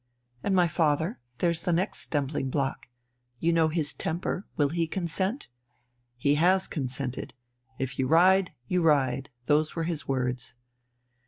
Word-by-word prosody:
"And 195 - +1
my 180 -2 +5
father? 160 +3 +1 0.2
There's 170 -2 +1
the 175 - 0
next 180 +4 0
stumbling 140 -2 -1
block. 135 0 -2 0.5
You 170 +1 +2
know 165 -1 +4
his 155 -2 -1
temper. 175 +3 -3
Will 145 -2 +3
he 165 +1 0
consent?" 190 - -2 0.7
"He 140 +4 +2
has 185 +2 +4
consented. 130 -3 -4 0.4
If 135 0 -4
you 130 - +2
ride, 185 +5 +5 0.2
you 180 +4 +1
ride. 140 -4 +2 0.2
Those 150 +2 +2
were 165 - -1
his 165 -2 -3
words...." 125 -2 -2
160 Hz, 145 wpm, -28 LUFS, 140-175 Hz, 0.7 s, my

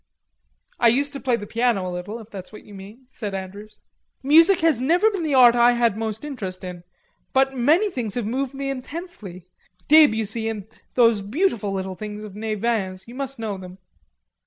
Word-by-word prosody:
"I 240 - +5
used 280 +5 +2
to 275 - -5
play 255 -3 +1
the 205 -3 -6
piano 230 -4 0
a 180 - -4
little, 180 +5 -5
if 225 -1 -13
that's 190 -2 -9
what 215 - -12
you 205 - -15
mean," 205 +6 -12
said 205 -6 -5
Andrews. 200 +3 -9 0.4
"Music 330 +7 +6
has 320 -7 +2
never 350 +11 +3
been 390 -4 -3
the 305 -4 0
art 245 -2 +8
I 240 0 +5
had 235 -3 +2
most 220 +3 -4
interest 195 -11 -6
in. 180 -1 -7 0.5
But 270 0 +2
many 315 - +3
things 230 - -4
have 240 -3 -2
moved 260 +4 -2
me 275 0 -3
intensely.... 255 - -8 0.4
Debussy 225 -7 +4
and 210 -3 -5 0.3
those 230 -4 +4
beautiful 220 - -1
little 190 -1 -3
things 210 +2 -7
of 205 -2 -10
Nevin's. 215 -3 -2
You 235 - -11
must 270 0 -5
know 215 -4 -4
them.... 185 0 -11
230 Hz, 185 wpm, -23 LUFS, 205-270 Hz, 0.5 s, art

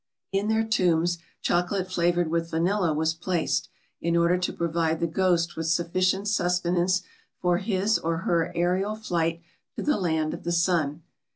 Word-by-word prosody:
In 195 +2 0
their 220 0 +2
tombs, 175 -5 +1 0.2
chocolate 185 +2 0
flavoured 175 -1 +1
with 165 0 -1
vanilla 175 +2 +1
was 160 +1 +1
placed, 175 +1 -1 0.3
in 170 0 +1
order 170 +1 +3
to 180 - -1
provide 165 -1 -1
the - - +1
ghost 170 0 +1
with 165 0 -3
sufficient 185 +4 +1
sustenance 180 -1 +1 0.4
for 180 -1 +2
his 205 +1 +1
or 165 0 -1
her 170 -2 +1
aerial 185 +5 +1
flight 170 -5 -1 0.3
to - - -4
the 300 - +2
Land 160 -4 0
of - - -8
the 170 - -2
Sun. 170 -3 +1
175 Hz, 160 wpm, -26 LUFS, 165-185 Hz, 0.4 s, order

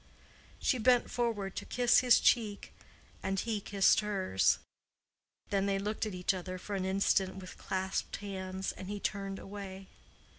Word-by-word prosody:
She 255 - +1
bent 245 +1 +3
forward 220 -5 -1
to - - -2
kiss 245 0 +4
his 250 -2 +6
cheek, 215 -4 +1 0.5
and 195 0 -1
he 220 -2 -2
kissed 195 -1 +4
hers. 195 - +2 0.9
Then 200 -1 +1
they 195 -1 +1
looked 210 +2 -2
at 205 - -5
each 180 +1 +1
other 185 0 -5
for 200 +2 -5
an 190 -1 -1
instant 190 0 +2
with 185 -1 -10
clasped 190 0 -2
hands, 190 -1 -4
and 185 - -9
he 205 0 -4
turned 195 -1 -3
away. 195 -1 -8
195 Hz, 155 wpm, -32 LUFS, 190-210 Hz, 0.9 s, his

